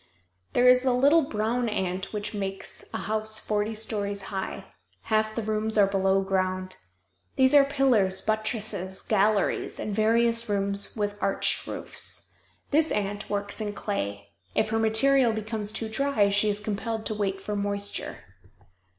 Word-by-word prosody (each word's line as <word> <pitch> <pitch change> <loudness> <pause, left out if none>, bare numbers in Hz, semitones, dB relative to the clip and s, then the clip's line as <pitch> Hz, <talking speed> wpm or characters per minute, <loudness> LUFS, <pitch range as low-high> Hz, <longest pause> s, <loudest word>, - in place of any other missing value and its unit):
There 245 - +4
is 250 0 +6
a 260 -1 +2
little 285 +6 +5
brown 235 -2 -1
ant 190 -2 -2
which 210 0 -4
makes 195 -2 -4
a - - -3
house 215 0 0
forty 215 +1 -1
stories 205 -2 -3
high; 190 -1 -4 0.4
half 215 0 0
the 230 - -2
rooms 215 +1 -1
are 205 - +7
below 195 0 +2
ground. 185 -1 -1 0.6
There 265 +2 +6
are - - +3
pillars, 245 -9 +2
buttresses, 215 -3 -2
galleries, 210 -1 +1
and 210 - -3
various 230 +2 +2
rooms 200 0 0
with 205 -1 -2
arched 195 - 0
roofs. - - -5 0.4
This 310 +2 +3
ant 205 0 -2
works 205 +1 -3
in 205 -1 -3
clay. 100 - -4 0.3
If 215 - +2
her 225 +1 0
material 230 +3 +3
becomes 215 -1 -3
too 220 +1 -3
dry 220 -3 +1
she 205 +1 +2
is 205 0 -1
compelled 220 +1 -3
to 220 - -2
wait 195 -2 -2
for 210 +2 -4
moisture. 200 0 -2
215 Hz, 150 wpm, -27 LUFS, 200-225 Hz, 0.6 s, are